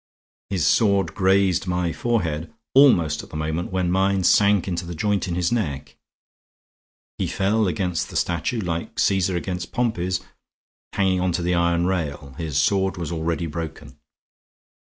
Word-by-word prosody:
His 95 -4 0
sword 100 -4 +3
grazed 95 -1 +2
my 90 -2 -1
forehead 85 -10 -1 0.2
almost 85 - +5
at - - -14
the - - -6
moment 80 +4 -3
when 90 -2 0
mine 95 0 +2
sank 100 +1 +4
into 90 -1 -2
the 85 0 -7
joint 100 +3 0
in 85 - -2
his 90 -1 0
neck. 75 - -2 1.2
He - - 0
fell 105 +2 +1
against 90 0 -2
the - - -10
statue, 85 +7 -1
like 85 -3 -4
Caesar 95 -1 +2
against 90 0 -4
Pompey's, 95 -7 -1 0.7
hanging 95 -2 +1
on 90 0 +1
to 85 +1 -1
the 90 +1 +1
iron 85 0 +2
rail; 75 -7 -3
his 80 -5 -3
sword 95 -1 +1
was 85 -2 -4
already 85 +1 -2
broken. 80 0 -7
90 Hz, 155 wpm, -23 LUFS, 85-95 Hz, 1.2 s, almost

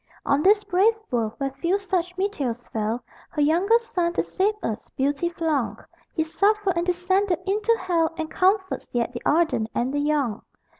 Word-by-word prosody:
On 280 +1 +2
this 410 +4 +5
brave 425 +5 +3
world, 225 -3 0
where 275 -1 -2
few 340 +8 0
such 360 -2 -2
meteors 280 - -2
fell, 220 +2 -2 0.3
Her 300 - -2
youngest 400 +10 +2
son, 340 -1 +1
to - - +1
save 405 +3 0
us, 215 - -2
Beauty 285 +5 +1
flung. 295 -11 -1 0.4
He 320 - +2
suffered 400 +3 +1
and 340 +1 -1
descended 365 +1 +1
into 425 +4 +2
hell 330 -3 +1
And 320 -2 -2
comforts 375 +1 +1
yet 240 0 0
the 240 - -5
ardent 310 -9 +2
and 250 +3 0
the 290 - 0
young. 290 -7 0
340 Hz, 170 wpm, -24 LUFS, 275-385 Hz, 0.4 s, this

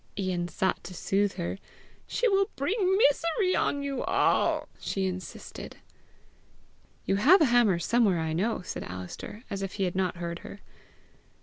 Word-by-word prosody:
Ian 185 -3 -1
sought 190 +3 -1
to 180 - -8
soothe 195 +3 +1
her. 180 +2 -4 0.5
"She - - +1
will 395 -2 +2
bring 380 - +1
misery 335 +2 +3
on 285 0 0
you 275 -2 -2
all!" - - +2
she 195 -1 -2
insisted. 185 0 -6 1.3
"You 195 - +1
have 315 - +7
a 315 - +5
hammer 240 -7 +4
somewhere, 205 +1 +2
I 160 -1 -1
know!" 195 +4 -1
said - - -5
Alister, 90 - -8
as 200 -1 -3
if 195 -1 -4
he 195 - -2
had 180 -1 -1
not 185 -2 0
heard 170 0 -4
her. 200 - -10
195 Hz, 160 wpm, -28 LUFS, 180-280 Hz, 1.3 s, have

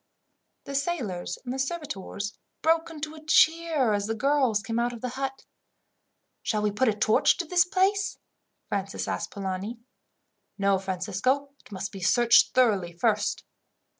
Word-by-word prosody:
The 280 - -7
sailors 245 - -2
and 260 +2 -2
servitors 215 - -4 0.3
broke 325 +1 +2
into 310 -1 -6
a 310 -1 -12
cheer 315 -5 +3
as 205 0 -1
the 225 - -1
girls 260 -4 +2
came 230 -1 -2
out 240 +1 0
of 235 - -9
the 250 - -2
hut. 270 +1 -5 1.0
"Shall 210 -1 -1
we 210 - +2
put 255 +6 +1
a 220 - +4
torch 215 +1 +3
to 345 - -2
this 350 +1 +4
place?" 390 +2 +1 0.5
Francis 195 0 -3
asked - - -2
Polani. 195 +3 -4 0.8
"No, 195 -1 +2
Francisco. 195 +9 -1
It - - -19
must 190 0 -4
be 195 - -8
searched 240 +5 +4
thoroughly 205 -9 +3
first. 210 +4 0
240 Hz, 150 wpm, -27 LUFS, 200-295 Hz, 1.0 s, a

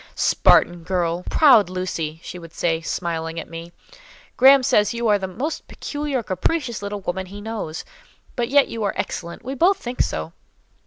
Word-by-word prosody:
"Spartan 175 0 +3
girl! 175 0 -1
Proud 255 - +6
Lucy!" 165 -4 -4
she 180 - -8
would 165 -1 -12
say, 165 -1 0
smiling 165 -1 -3
at - - -7
me. 165 +1 -9 0.6
"Graham 270 +1 +7
says 210 -3 +2
you 235 0 -1
are 205 -1 +4
the 190 - -3
most 270 - -4
peculiar, 290 -4 -3
capricious 235 - -2
little 205 0 -5
woman 190 +1 -3
he 200 +2 -9
knows; 205 -7 -5 0.5
but 240 -1 -1
yet 280 +1 +5
you 230 - -6
are 200 - -1
excellent; 170 +7 -5
we 265 - -3
both 360 +9 +3
think 250 -7 -3
so." 80 +1 -3
195 Hz, 170 wpm, -22 LUFS, 170-245 Hz, 0.6 s, Graham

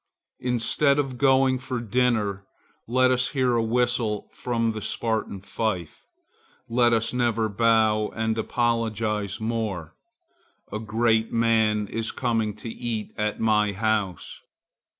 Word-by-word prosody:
Instead 125 +4 +2
of 140 -2 0
the - - -8
gong 130 -1 +3
for 130 -1 -4
dinner, 110 -4 0 0.4
let 130 +2 +3
us 125 0 +2
hear 130 -3 +1
a 115 - +2
whistle 115 -2 0
from 115 -2 -1
the 110 -1 -6
Spartan 110 -3 -2
fife. 95 -5 -4 0.6
Let 120 0 +3
us 115 0 +1
never 120 -3 +1
bow 110 0 +2
and 110 0 0
apologize 110 -3 -1
more. 110 -7 -3 0.8
A 105 - -2
great 110 0 +1
man 110 -2 +2
is 115 +2 -3
coming 115 -4 -1
to 110 - -9
eat 115 -2 -4
at 105 0 -2
my 105 -2 +2
house. 105 -2 -2
115 Hz, 130 wpm, -25 LUFS, 105-120 Hz, 0.8 s, gong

